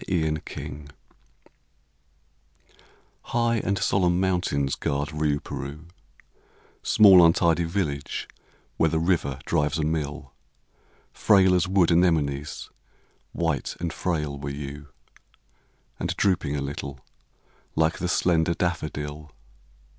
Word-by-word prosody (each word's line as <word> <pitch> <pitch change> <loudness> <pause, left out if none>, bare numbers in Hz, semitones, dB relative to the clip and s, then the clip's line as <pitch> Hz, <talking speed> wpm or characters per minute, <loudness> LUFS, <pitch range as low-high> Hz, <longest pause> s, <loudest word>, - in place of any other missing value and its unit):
RIOUPEROUX 75 -3 -3 2.3
High 115 0 0
and 100 -2 -1
solemn 90 -3 +2
mountains 90 -8 0
guard 70 +1 -2
Riouperoux, 75 0 -3 0.9
Small 95 -4 +7
untidy 85 0 +3
village 80 -5 -3 0.5
where 80 - +3
the 80 - 0
river 80 -5 0
drives 75 +2 0
a 80 - -1
mill: 75 -2 -3 0.8
Frail 95 -3 +4
as 90 0 +2
wood 95 -2 +3
anemones, 75 -4 +1 0.6
white 80 -4 -2
and 85 -1 -3
frail 75 -5 -2
were 70 0 -5
you, 70 +1 -7 1.1
And - - -3
drooping 85 -7 +1
a 70 - -2
little, 70 -1 -5 0.8
like 80 0 +1
the 90 - -1
slender 85 -1 +2
daffodil. 75 -3 -3
80 Hz, 100 wpm, -25 LUFS, 75-90 Hz, 2.3 s, Small